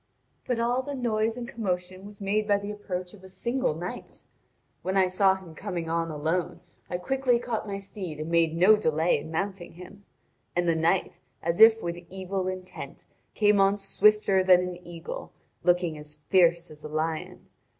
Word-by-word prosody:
But 245 - 0
all 240 +2 +1
the 285 +1 -5
noise 225 -2 0
and 240 -1 -5
commotion 185 -4 -4
was 205 -1 -13
made 210 +1 0
by 205 -1 +4
the 200 +1 -5
approach 185 -3 -5
of 195 -3 -15
a - - -10
single 235 0 -1
knight. 180 +9 -7 0.6
When 190 +1 -1
I 190 - +5
saw 190 +1 +3
him 185 -4 -11
coming 170 -2 -4
on 165 0 0
alone 165 +4 -2 0.3
I 175 - -2
quickly 255 +6 +1
caught 235 -2 -3
my 200 -1 -3
steed 190 -5 -7
and 155 +2 -4
made 165 -1 +2
no 190 +5 +7
delay 160 -4 +1
in - - -9
mounting 190 +2 -4
him. 185 +4 -13 0.5
And 175 0 +1
the 165 - +4
knight, 170 +2 +1 0.2
as 170 +3 0
if 225 0 +8
with 170 0 -4
evil 190 0 -3
intent, 185 0 -7 0.3
came 205 -1 +4
on 195 +1 +4
swifter 200 -1 +3
than 180 -1 +6
an 180 -1 -6
eagle, 170 -1 -7 0.3
looking 175 -3 +1
as 150 0 -10
fierce 170 -2 +4
as 150 0 -13
a 150 - -6
lion. 155 - -3
185 Hz, 180 wpm, -27 LUFS, 170-205 Hz, 0.6 s, if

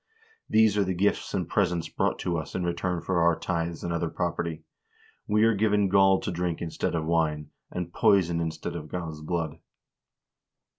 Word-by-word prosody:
These 110 -2 +4
are - - +4
the 95 -1 -2
gifts 100 +4 +1
and 90 -3 -1
presents 90 -4 0
brought - - 0
to 85 - -1
us 80 -3 -4
in 95 - -1
return 85 0 -1
for 90 -1 +1
our 85 -1 +4
tithes 85 -2 -3
and 85 - -2
other 85 0 -1
property. 85 -2 -3 0.6
We 105 +1 +3
are 115 0 +5
given 105 -1 +2
gall 95 0 +5
to - - -3
drink 85 -1 -2
instead 85 0 -2
of 80 -1 -1
wine, 80 -2 0 0.2
and 90 -1 -5
poison 85 -4 +3
instead 80 -1 -4
of 75 - -6
God's 80 -4 -5
blood." 80 -1 -3
85 Hz, 180 wpm, -27 LUFS, 80-95 Hz, 0.6 s, are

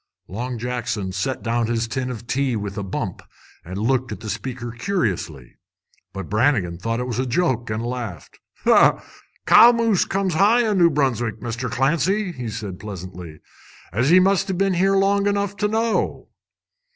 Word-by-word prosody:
Long 120 +5 -4
Jackson 115 -5 -3
set 125 +8 -3
down 115 0 0
his 115 0 -1
tin 130 +2 -3
of 120 -2 -7
tea 130 -1 0
with 100 -2 -4
a - - -3
bump 95 -1 -4 0.4
and 95 +3 -7
looked 125 +4 0
at - - -5
the 110 - -4
speaker 120 +2 -5
curiously. 105 - -3 0.5
But 95 -3 -6
Brannigan 105 -7 +1
thought 115 +4 -2
it 125 - -2
was 125 -2 -3
a 130 - 0
joke, 125 -4 0
and 110 +2 -3
laughed. 120 -8 -6 0.3
"Cow 235 - +4
moose 230 -5 +2
comes 195 -1 -1
high 220 +8 +4
in 205 -3 +1
New 170 -1 +6
Brunswick, 120 -7 -1
Mr. 120 +2 -4
Clancy," 170 - 0
said 105 -2 -5
he 90 - -9
pleasantly, 90 -5 -9 0.5
"as 120 +8 +1
ye 185 - +8
must 195 +1 +2
a' 190 - 0
been 195 +1 +1
here 195 +2 +2
long 200 +1 +2
enough 200 -1 0
to 210 - +1
know." 225 +1 -1
125 Hz, 170 wpm, -22 LUFS, 110-180 Hz, 0.5 s, ye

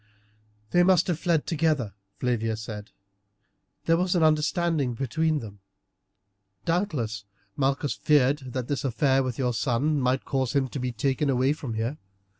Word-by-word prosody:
"They 175 - +5
must 180 -1 +5
have 175 -3 -1
fled 165 -4 +1
together," 150 - 0 0.2
Flavia 115 -3 -1
said. 105 -1 -7 1.0
"There 165 0 +4
was 180 +1 +1
an 170 - +3
understanding 155 -3 +2
between 155 +5 0
them. 100 -3 -10 1.1
Doubtless 145 - -1 0.3
Malchus 140 +1 0
feared 145 -1 +3
that 130 -2 -3
this 145 - -2
affair 135 +1 +2
with 130 -3 -3
your 125 -2 0
son 140 +5 +1
might 130 +1 +1
cause 130 -3 -1
him 140 -2 +2
to 135 - -5
be 125 0 -2
taken 135 +5 0
away 130 +2 +2
from 135 -7 -6
here. 115 +7 -2
135 Hz, 150 wpm, -26 LUFS, 125-155 Hz, 1.1 s, They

